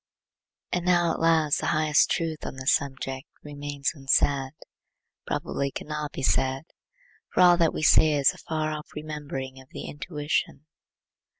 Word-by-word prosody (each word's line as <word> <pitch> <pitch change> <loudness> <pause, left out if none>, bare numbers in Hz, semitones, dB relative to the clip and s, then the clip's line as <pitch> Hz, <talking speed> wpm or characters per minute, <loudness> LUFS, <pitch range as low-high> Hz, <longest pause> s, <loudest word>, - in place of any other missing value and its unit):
And 180 - -1
now 175 -2 +3
at - - -3
last 160 -2 +3
the - - -2
highest 155 -1 +3
truth 160 -2 -2
on - - -5
this 130 +1 +2
subject 135 -2 -3 0.2
remains 145 -1 -3
unsaid; 135 -1 +1 0.7
probably 140 0 -2
cannot 150 +1 -5
be 135 - -6
said; 135 +1 +1 0.7
for - - +2
all 175 -1 +8
that 165 -2 +3
we - - -4
say 155 0 +6
is 140 -2 +4
the - - -6
far 155 -1 -2
off 150 0 -6
remembering 145 -4 -6
of 130 - -19
the - - -8
intuition. 150 -1 -3
150 Hz, 155 wpm, -26 LUFS, 135-155 Hz, 0.7 s, all